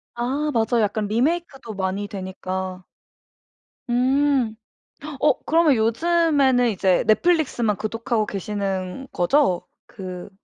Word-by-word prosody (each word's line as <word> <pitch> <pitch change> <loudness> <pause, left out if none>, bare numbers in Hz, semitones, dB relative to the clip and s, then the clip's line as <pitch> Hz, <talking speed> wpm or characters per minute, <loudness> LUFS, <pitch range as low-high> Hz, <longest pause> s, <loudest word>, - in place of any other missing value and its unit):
아 275 +5 -1
맞아요. 230 0 +2
약간 210 0 -1
리메이크도 270 +1 -1
많이 195 +1 -2
되니까. 185 -1 -5 1.1
음. 260 -1 +2 0.7
어 300 - +3
그러면 325 -2 +4
요즘에는 265 0 +2
이제 190 -1 +2
넷플릭스만 240 - +2
구독하고 225 +1 -2
계시는 195 +3 -4
거죠? 180 0 +2 0.2
그 185 -1 -8
225 Hz, 240 characters per minute, -22 LUFS, 195-275 Hz, 1.1 s, 그러면